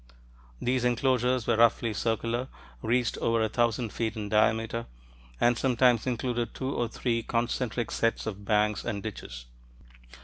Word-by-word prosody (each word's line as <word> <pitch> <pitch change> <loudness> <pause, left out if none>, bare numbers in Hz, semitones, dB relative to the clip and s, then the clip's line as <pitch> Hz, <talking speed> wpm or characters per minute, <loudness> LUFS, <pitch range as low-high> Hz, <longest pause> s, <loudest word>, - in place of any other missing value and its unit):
These 125 0 0
enclosures 125 0 +2
were 115 - +2
roughly 115 -1 +3
circular, 115 +3 -1 0.3
reached 120 +1 0
over 115 0 +1
a 110 - 0
thousand 115 0 0
feet 115 -1 -2
in 105 -2 -4
diameter, 110 +2 +1 0.5
and 120 0 +4
sometimes 125 -2 +3
included 120 -1 -2
two 130 +1 -3
or 120 - 0
three 115 0 -1
concentric 120 0 -1
sets 115 0 0
of 105 -2 -5
banks 105 0 +1
and 100 -1 -3
ditches. - - -7
115 Hz, 140 wpm, -28 LUFS, 110-120 Hz, 0.5 s, and